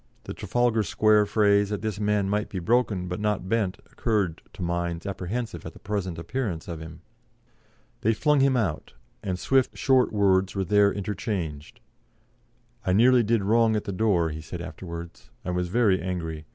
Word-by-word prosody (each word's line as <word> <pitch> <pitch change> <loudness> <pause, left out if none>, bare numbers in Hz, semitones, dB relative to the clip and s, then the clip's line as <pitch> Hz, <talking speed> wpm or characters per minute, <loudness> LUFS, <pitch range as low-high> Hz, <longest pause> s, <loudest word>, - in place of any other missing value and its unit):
The - - -6
Trafalgar 120 -2 +1
Square 105 +2 +3
phrase 100 -1 +3
that 105 0 -3
this 105 -2 -3
man 105 -1 +1
might 105 +1 -1
be 95 - -5
broken 100 -1 +1
but 90 +2 -4
not 105 -3 -1
bent 100 -3 0
occurred 100 -8 -1
to - - -6
minds 85 0 -2
apprehensive 100 +5 -4
at - - -8
the - - -14
present 95 -4 -3
appearance 85 -1 -3
of 85 -2 -5
him." 80 +1 -10 1.0
They 110 +1 +2
flung 150 +3 +3
him 135 -1 +3
out, 90 -10 -2 0.3
and 95 -2 -2
swift, 130 +7 +1
short 130 -2 +3
words 95 -2 +2
were 95 -1 -1
there 100 +2 +4
interchanged. 95 -7 -4 1.0
"I 90 - +1
nearly 120 +5 +5
did 115 -1 +1
wrong 110 +2 +3
at 105 - -1
the 100 - -4
door," 90 -6 +2
he 80 +1 -6
said 85 +3 -7
afterwards, 85 -4 -8 0.2
"I - - -2
was 90 0 -1
very 100 -1 +2
angry. 80 -4 -4
100 Hz, 175 wpm, -26 LUFS, 90-110 Hz, 1.0 s, nearly